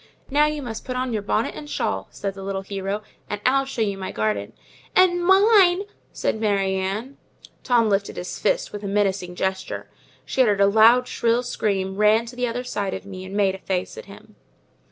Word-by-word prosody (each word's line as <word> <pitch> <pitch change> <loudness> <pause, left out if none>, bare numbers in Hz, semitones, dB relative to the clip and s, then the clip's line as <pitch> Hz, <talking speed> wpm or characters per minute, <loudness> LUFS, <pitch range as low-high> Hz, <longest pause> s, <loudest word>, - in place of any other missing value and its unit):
"Now 295 +2 +4
you 300 -1 -3
must 225 -3 -6
put 255 - -5
on 255 -1 -2
your 215 - -1
bonnet 215 +2 -1
and 150 -1 -9
shawl," 95 -8 -2
said 200 -1 -4
the 195 - -10
little 195 0 -3
hero, 195 +1 -4 0.3
"and 205 - -3
I'll 270 +2 +3
show 260 -4 -2
you 200 -2 -2
my 190 - -4
garden." 105 -1 -2 0.4
"And 350 -1 +4
mine," 385 -1 +5 0.3
said 220 - -2
Mary 200 -3 +1
Ann. 200 +8 -3 0.5
Tom 235 -3 +3
lifted 200 -1 0
his 180 - -5
fist - - 0
with 205 - -5
a 200 - -5
menacing 195 -3 0
gesture; 190 +1 -3 0.3
she 265 - 0
uttered 210 -5 +3
a - - +7
loud, 225 +5 +5
shrill 235 +1 +1
scream, 195 -5 -2
ran 215 +2 +4
to 240 +1 -10
the 250 0 -1
other 240 +2 -3
side 205 -6 -3
of - - -8
me, 185 -1 -8
and 190 +1 -8
made 195 -2 +3
a 190 - -8
face 185 -1 -3
at - - -9
him. 215 +1 -15
210 Hz, 205 wpm, -23 LUFS, 195-250 Hz, 0.5 s, a